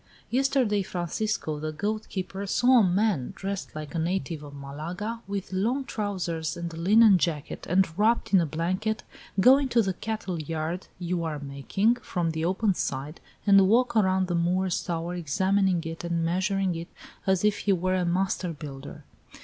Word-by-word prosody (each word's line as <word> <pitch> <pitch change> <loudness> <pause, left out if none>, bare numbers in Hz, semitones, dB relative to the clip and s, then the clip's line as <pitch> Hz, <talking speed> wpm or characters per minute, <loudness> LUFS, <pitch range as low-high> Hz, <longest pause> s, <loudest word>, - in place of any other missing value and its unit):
Yesterday, 255 -5 +2
Francisco, 175 -2 -2
the 155 +1 -3
goat 210 +7 -3
keeper, 195 +1 -4
saw 250 +5 +5
a - - +5
man 185 - +1
dressed 195 -3 -5
like 150 -2 -6
a 165 - -1
native 165 -2 -2
of 145 -1 -10
Malaga, 170 +11 -5
with 200 -1 -4
long 235 +9 0
trousers 175 -8 -3
and 170 -1 -5
a - - -7
linen 200 +3 +6
jacket, 155 -4 -2
and 190 +2 +4
wrapped 225 0 +2
in 190 - +7
a 165 - 0
blanket, 185 +8 -1 0.4
go 255 +7 +7
into 260 -4 +1
the 190 -2 -1
cattle 195 -4 -4
yard 160 +3 -3
you 175 -1 -2
are 160 -2 -2
making, 140 - 0
from 175 -8 -2
the 160 0 -3
open 190 +4 +2
side, 140 -1 -4 0.2
and 195 -2 +6
walk 245 +3 +3
around 190 -3 +3
the 180 - -3
Moor's 180 +2 +1
Tower, 170 0 -3
examining 185 +2 +1
it 165 0 -6
and 170 -1 -1
measuring 190 +2 0
it, 165 0 -5 0.4
as 190 +1 +2
if 205 -1 +2
he 205 - +1
were 185 0 +1
a 185 -1 +1
master 180 0 0
builder. 140 -3 -9
185 Hz, 175 wpm, -27 LUFS, 165-205 Hz, 0.4 s, in